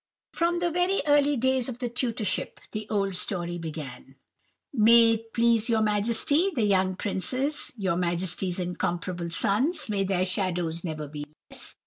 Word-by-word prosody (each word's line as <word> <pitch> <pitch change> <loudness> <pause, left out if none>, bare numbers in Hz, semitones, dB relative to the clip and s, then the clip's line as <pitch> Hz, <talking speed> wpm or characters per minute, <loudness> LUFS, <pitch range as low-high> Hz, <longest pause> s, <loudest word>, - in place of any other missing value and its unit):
"From 345 +1 +1
very 355 +2 +1
early 290 -1 +3
days 260 +1 +1
of 240 - -6
the 250 -1 -3
tutorship, 235 -3 -1
the 215 0 -6
old 195 -2 0
story 175 -2 -1
began:— 150 -5 -8 0.6
"'May 230 -1 +6
it 225 0 -3
please 230 -1 +2
your 220 -1 +2
Majesty, 230 - +2
the 230 -5 +1
young 190 -2 +2
princes, 255 +10 -1
your 190 -4 0
Majesty's 180 +1 -1
incomparable 175 -1 -3
sons—may 215 - +1
their 185 -1 +1
shadows 180 -3 -2
never 155 -3 -4
be 145 0 -7 0.3
less! - - -3
210 Hz, 140 wpm, -26 LUFS, 180-245 Hz, 0.6 s, May